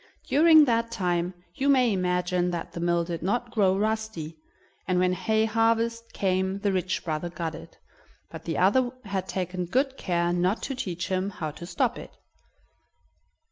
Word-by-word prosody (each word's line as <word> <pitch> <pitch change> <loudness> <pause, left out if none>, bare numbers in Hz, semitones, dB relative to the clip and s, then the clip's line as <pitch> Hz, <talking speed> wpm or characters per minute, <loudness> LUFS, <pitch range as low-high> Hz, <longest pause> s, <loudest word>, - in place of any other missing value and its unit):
During 315 +1 +7
that 230 -2 +1
time 180 -4 -1 0.2
you 280 0 0
may 255 -5 +4
imagine 180 -1 0
that 170 -1 -4
the - - -5
mill 170 0 +1
did 170 -1 -5
not 240 +6 -1
grow 195 -4 +3
rusty, 215 -7 -2 0.5
and 185 -1 +1
when 180 0 +3
hay 220 +3 +1
harvest 230 +1 +1
came 190 0 0
the 200 0 0
rich 185 0 -1
brother 160 +1 -2
got 170 -2 -4
it, - - -11 0.5
but - - -9
the - - -2
other 260 -1 +3 0.2
had 190 -1 -3
taken 180 -1 -3
good 265 +8 0
care 175 -1 0
not 180 +4 0
to 275 - -2
teach 180 -9 -4
him 190 +1 0
how 160 -6 -5
to 170 +3 -10
stop 245 +6 0
it. - - -12
190 Hz, 170 wpm, -26 LUFS, 175-230 Hz, 0.5 s, During